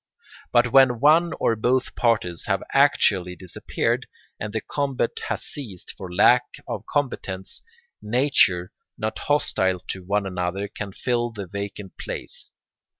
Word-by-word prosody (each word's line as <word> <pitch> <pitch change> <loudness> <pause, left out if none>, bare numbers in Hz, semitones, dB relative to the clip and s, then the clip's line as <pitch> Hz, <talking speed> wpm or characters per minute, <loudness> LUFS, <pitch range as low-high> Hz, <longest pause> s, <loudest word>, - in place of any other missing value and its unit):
But 120 0 +4
when 130 -3 +6
one 160 +5 +5
or 115 - +2
both 125 +4 +1
parties 105 -8 +1
have - - +1
actually 90 -1 +3
disappeared, 90 -1 -2 0.3
and 105 - -4
the 110 - -1
combat 135 -1 -1 0.2
has - - -2
ceased 110 -11 -7
for 90 -2 -8
lack 90 - +6 0.2
of - - -4
combatants, 100 -9 -2 0.4
natures 105 -7 +3 0.3
not 110 0 -3
hostile 95 -10 +1
to 95 - -3
one 100 +2 0
another 90 +1 -2
can 100 0 -6
fill 120 +3 0
the 105 -4 -6
vacant 100 +1 -7
place. - - -6
105 Hz, 135 wpm, -24 LUFS, 95-125 Hz, 0.4 s, when